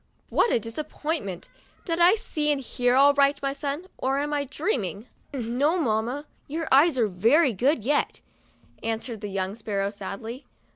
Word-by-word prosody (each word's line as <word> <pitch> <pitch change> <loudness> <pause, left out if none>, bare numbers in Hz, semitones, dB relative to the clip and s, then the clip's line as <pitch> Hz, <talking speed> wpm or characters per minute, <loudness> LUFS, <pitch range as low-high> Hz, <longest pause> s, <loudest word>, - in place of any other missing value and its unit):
"What 470 - +3
a - - +3
disappointment! 230 - -4 0.4
Did 335 -2 -1
I 350 +4 +7
see 310 -10 -1
and 285 - +1
hear 245 -1 0
all 280 +2 +6
right, 280 0 +3
my 275 0 0
son, 285 +4 -3
or 270 +1 0
am 295 +1 -1
I 285 -1 0
dreaming?" 245 - -2 0.3
"No, 270 +5 0
mamma, 245 0 -1 0.2
your 320 +3 -3
eyes 280 +2 +5
are 230 -3 +3
very 235 - +3
good 250 - +1
yet," 290 +2 +1 0.6
an 225 0 -1
swered 225 -2 -7
the 210 - -4
young 190 0 -2
sparrow, 200 -3 -2
sadly. 215 +5 -7
270 Hz, 165 wpm, -26 LUFS, 220-295 Hz, 0.6 s, I